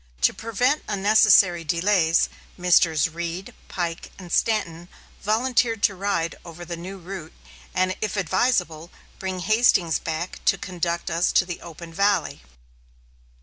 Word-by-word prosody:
To - - +4
prevent 245 +6 0
unnecessary 200 -4 +4
delays, 170 +1 +2 0.3
Messrs. 175 -3 +3
Reed, 170 +3 -6
Pike, 170 -2 -4
and 180 -3 -11
Stanton 175 -6 0 0.3
volunteered 230 0 +1
to 200 - +4
ride 180 -4 -1
over 175 +1 -10
the 170 0 -5
new 185 +4 -8
route, 180 -3 -8 0.4
and, 185 0 +1
if 215 -1 -2
advisable, 180 -4 0 0.3
bring 185 -1 -4
Hastings 195 -5 +3
back 165 +2 -5
to - - +3
conduct 170 -2 -3
us 170 +2 +1
to 185 - +4
the 175 -2 -6
open 170 0 -10
valley. 200 - +1
180 Hz, 130 wpm, -24 LUFS, 170-205 Hz, 0.4 s, To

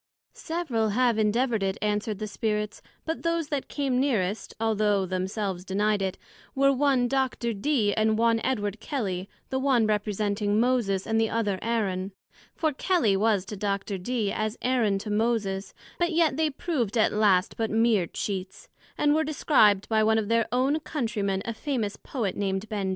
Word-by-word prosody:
Several 280 -10 -2
have 235 +1 +2
endeavoured 225 +1 +1
it, 195 0 -1
answered 210 0 -1
the 215 - -4
Spirits, 210 0 -2 0.2
but 320 0 -3
those 335 -2 -1
that 285 -4 -2
came 270 -3 -1
nearest 220 -7 -1
(although 210 -3 +1
themselves 185 0 -3
denied 205 +2 0
it) 190 -1 -2 0.4
were 275 0 +4
one 265 -2 +2
Dr. 260 -2 -1
Dee, 215 -1 +1
and 220 0 +2
one 230 0 +3
Edward 210 -5 -1
Kelly, 200 -9 -3 0.2
the 265 - 0
one 265 -4 +3
representing 210 0 0
Moses, 230 -6 +1
and 225 0 +1
the 225 - +1
other 205 -4 -1
Aaron; 200 -4 -1 0.4
for 315 -2 0
Kelly 285 - +2
was 205 -1 +2
to 210 - -6
Dr.Dee, 200 +2 -2
as 215 +1 -2
Aaron 240 -6 +2
to 210 +2 -5
Moses; 210 -3 0 0.3
but 345 0 +1
yet 320 -4 +2
they 315 +1 +1
proved 270 - -2
at 220 - +3
last 205 -3 +3
but 225 -1 -1
meer 220 -5 +2
Cheats; 190 0 -5 0.3
and 295 0 +3
were 315 +1 +2
described 240 -10 +3
by 220 -1 +2
one 220 +1 +3
of 215 -1 -1
their 230 -1 +2
own 265 +5 +2
Country 235 -9 -3
men, 195 -1 -1
a 230 - -3
famous 225 -5 -2
Poet, 225 -8 -3
named 195 +1 -2
Ben. 200 -3 -2
220 Hz, 170 wpm, -27 LUFS, 200-255 Hz, 0.4 s, were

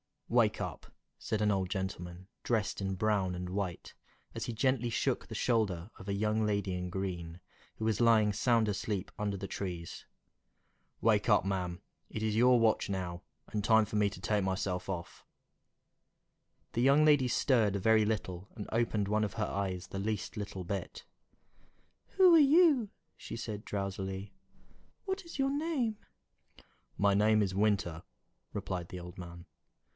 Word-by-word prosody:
"WAKE - - +3
up!" - - -6 0.3
said 110 -1 -2
an 105 -1 +3
old 95 -2 0
gentleman, 90 -1 -5
dressed 110 -3 -1
in 95 -1 -1
brown 100 -2 +1
and 90 0 -5
white, 95 -2 -4 0.4
as - - -4
he 120 - -4
gently 125 +1 +1
shook 115 - -1
the - - -7
shoulder 105 -6 0
of 95 - -11
a 100 - -1
young 110 +2 +1
lady 100 -3 0
in 90 0 -3
green, 90 -3 -4 0.4
who 110 - -4
was 110 0 +1
lying 110 -3 +5
sound 115 +1 +2
asleep 100 -1 -3
under 105 -1 -1
the 100 0 -5
trees. 90 -4 -5 1.0
"Wake 105 -1 +3
up, 105 -4 +4
ma'am! 90 -3 -2 0.3
it 110 - -4
is 110 -1 +1
your 125 +2 +5
watch 110 -2 +2
now, 90 -3 -3 0.3
and 105 -1 -2
time 110 0 +5
for 105 - -3
me 105 -1 +3
to 100 - -11
take 105 -2 +1
myself 95 -1 -2
off." 85 -3 -5 1.5
The 120 - -1
young 140 +4 +5
lady 145 -4 +5
stirred 115 -5 +2
a - - 0
very 110 +2 +4
little, 100 -4 -3
and 105 - -6
opened 110 -3 0
one 110 0 +2
of 100 - -5
her 110 - -1
eyes 95 -3 -3
the 95 - -5
least 105 +1 -3
little 100 -3 -5
bit. 95 +2 -5 1.1
"Who 370 -2 +6
are 330 - +8
you?" 290 - +5 0.3
she - - -7
said, 110 -2 -5
drowsily. 95 0 -4 0.7
"What 385 -2 -3
is 335 - -9
your 270 0 +1
name?" 285 -7 -1 1.0
"My 100 0 +3
name 105 +1 +4
is 95 -2 -2
Winter," 100 -5 +1 0.5
replied 90 -2 -4
the 90 - -6
old 90 0 -10
man. 85 -1 -9
105 Hz, 165 wpm, -32 LUFS, 95-110 Hz, 1.5 s, are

